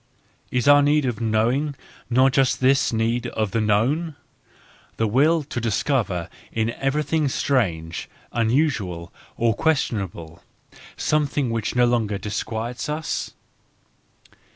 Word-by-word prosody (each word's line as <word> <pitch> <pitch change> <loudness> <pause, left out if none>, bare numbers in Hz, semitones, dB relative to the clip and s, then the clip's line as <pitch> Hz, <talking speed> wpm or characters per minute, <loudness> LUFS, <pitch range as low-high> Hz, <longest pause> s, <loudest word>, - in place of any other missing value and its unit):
ls 125 -2 0
°ur 145 0 +7
need 145 0 +3
of 120 -3 -2
knowing 120 +7 +1 0.3
not 130 +2 +4
just 135 -1 +2
this 135 +1 +3
need 115 +1 0
of 110 -3 -2
the 115 - 0
known? 130 +10 +1 0.8
the 115 - +1
will 150 +9 +3
to 125 -4 -5
discover 105 - 0 0.2
in 110 0 0
thfrior 135 +4 -2
1 150 - +1
V? 155 +3 -1
f 135 - -1
trang 90 - 0
^' - - -5 0.3
uuusual, 115 - 0 0.3
or 115 -1 +2
questionable, 100 - -2 0.6
some¬ 150 -1 +1
thing 140 -5 -1
which 115 -1 -2
no 125 0 +5
longer 115 -4 +1
disquiets 110 +5 -4
us? 155 +1 -3
120 Hz, 135 wpm, -23 LUFS, 110-140 Hz, 0.8 s, °ur